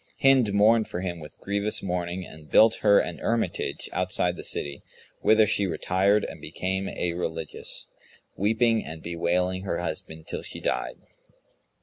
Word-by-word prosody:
Hind 135 -6 +4
mourned 110 +2 +4
for 90 - -5
him 90 -2 -4
with 75 -1 -12
grievous 100 +2 0
mourning 90 0 -3
and 80 -1 -13
built 110 0 +6
her 100 -1 +5
an 85 - -3
hermitage 115 0 -1
outside 90 -1 0
the - - -8
city, 70 -1 +1 0.4
whither 110 +1 +5
she 100 -1 +1
retired 95 +5 +1
and - - -9
became 95 +1 -3
a 85 -1 -2
religious, 80 -2 -4 0.5
weeping 115 +2 +2
and 80 0 -8
bewailing 90 +2 0
her 95 - -2
husband 80 0 -5
till - - -4
she - - -4
died. - - -2
95 Hz, 150 wpm, -26 LUFS, 85-105 Hz, 0.5 s, built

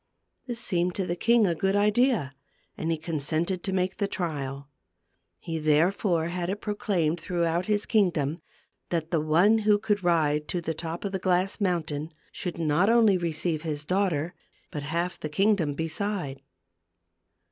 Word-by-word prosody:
This 240 -2 -3
seemed 180 -6 0
to 190 - -1
the 175 - -2
king 230 +4 +4
a 175 - +2
good 190 +4 0
idea, 210 - +2 0.4
and 160 - -3
he 165 - +1
consented 160 +3 -1
to 190 - -3
make 185 0 0
the 200 - 0
trial. 140 -7 -3 0.7
He 165 - -4
therefore 165 +2 +2
had 175 0 -3
it 200 +2 -2
proclaimed 180 -6 -1
throughout 170 0 0
his 210 -1 +1
kingdom, 170 -7 +1 0.5
that 165 -2 -2
the 165 -3 +2
one 175 +9 +4
who 210 -1 +4
could 205 -1 -1
ride 150 -3 +2
to 180 - -2
the 165 -1 -3
top 165 +3 -5
of 200 - -2
the 190 - -2
glass 185 +2 +1
mountain, 160 -5 -1 0.2
should 175 -2 -5
not 165 +4 +2
only 230 -4 +5
receive 165 -1 -1
his 150 -2 -4
daughter, 175 -3 0 0.4
but 150 - -4
half 170 +5 -2
the 155 - -4
kingdom 180 -3 +2
beside. 160 -3 -3
175 Hz, 160 wpm, -27 LUFS, 155-195 Hz, 0.7 s, only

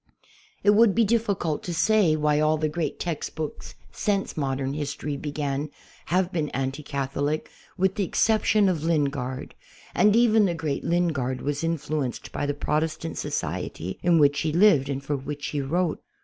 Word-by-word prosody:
It 205 - +6
would 210 -1 +5
be 230 - +4
difficult 200 -8 0
to 175 - -4
say 200 -3 +3
why 150 -1 +2
all 155 +1 +3
the 155 0 0
great 155 +1 -3
text 170 -4 -4
books 155 -2 -6 0.2
since 200 -2 -1
modern 135 -2 -2
history 145 0 -3
began 145 0 -3 0.4
have 180 +1 +1
been 155 -5 -1
anti 135 +2 -2
Catholic, 140 +2 -2 0.3
with 190 +1 +2
the 205 - -1
exception 215 +1 +3
of 170 -5 0
Lingard, 140 -5 -1 0.4
and 210 0 +4
even 225 -2 +5
the 175 -3 0
great 155 -4 -3
Lin 175 +1 +2
gard 130 -4 -2
was 145 +1 -2
influenced 155 -5 -2
by 145 - -2
the 145 - -1
Protestant 160 +2 -2
society 90 +3 -4
in 175 -1 +4
which 145 -2 +4
he 160 - 0
lived 165 -6 +4
and 135 0 -3
for 145 +1 -1
which 145 +1 -5
he 145 - -2
wrote. 165 +4 -1
155 Hz, 170 wpm, -25 LUFS, 140-180 Hz, 0.4 s, It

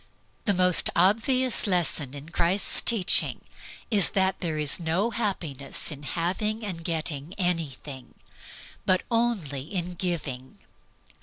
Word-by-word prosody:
The 205 - +3
most 180 -1 +3
obvious 230 +8 +3
lesson 160 -7 0
in 145 +3 -9
Christ's 175 +4 +2
teaching 215 -6 +3 0.5
is 205 -4 +5
that 190 0 +2
there 165 -4 -1
is 150 +1 +1
no 175 +7 0
happiness 165 - -1
in 145 -1 -7
having 200 +8 -2
and 170 -5 -5
getting 160 -1 -3
anything, 150 -7 -3 0.7
but 185 -1 +2
only 220 - 0
in 175 +4 -4
giving. 155 -8 -4
175 Hz, 120 wpm, -26 LUFS, 150-200 Hz, 0.7 s, is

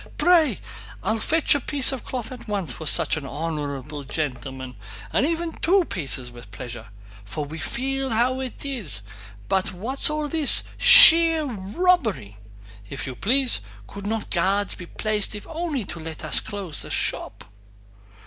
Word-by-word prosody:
Pray!... 320 - +3 0.4
I'll 220 0 -1
fetch 320 +7 +3
a 285 - 0
piece 275 0 +1
of 265 - -6
cloth 250 -1 -6
at 255 - -10
once 195 -10 -2
for 160 - -6
such 155 - +1
an 150 - -7
honorable 145 -1 -5
gentleman, 130 -3 -6 0.4
or - - +2
even 330 +2 -1
two 370 +2 +1
pieces 135 - -3
with 120 -3 -14
pleasure. 115 +2 -9 0.4
For 110 +9 -5
we 155 +3 -8
feel 270 +5 0
how 245 +3 0
it 260 +1 -7
is; 190 - -2 0.4
but 190 -1 -1
what's 240 +12 0
all 300 0 -3
this—sheer 330 - +7
robbery! 220 - -1 0.5
If 135 - -6
you 130 - -6
please, 255 - +1 0.2
could 200 - -9
not 220 0 -4
guards 195 +3 +1
be 180 - -10
placed 215 +1 -2
if 210 - -8
only 320 - -4
to 175 - -7
let 160 0 -8
us - - +2
close 195 -7 -6
the - - -7
shop...." - - -2
205 Hz, 155 wpm, -23 LUFS, -, 0.5 s, this—sheer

